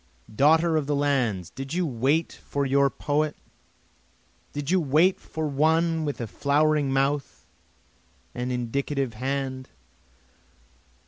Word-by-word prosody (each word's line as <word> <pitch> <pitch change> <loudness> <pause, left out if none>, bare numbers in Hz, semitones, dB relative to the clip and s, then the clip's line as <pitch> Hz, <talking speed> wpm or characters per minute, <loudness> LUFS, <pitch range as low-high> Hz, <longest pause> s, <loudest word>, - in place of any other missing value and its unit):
Daughter 160 +5 +4
of 145 -3 -1
the 145 - +1
lands 125 - 0
did 135 +4 -6
you 180 0 +1
wait 140 +4 0
for 140 -1 -2
your 140 +1 +3
poet? 150 +2 -1 1.1
Did 145 +2 -4
you 185 - +4
wait 160 +6 +3
for 160 0 -5
one 160 +3 +1
with 145 -1 -3
a 120 - -2
flowing 145 +4 +1
mouth 135 +1 -1 0.9
and 125 +1 -3
indicative 130 +1 -2
hand? 130 +2 -3
140 Hz, 120 wpm, -25 LUFS, 135-155 Hz, 1.1 s, Daughter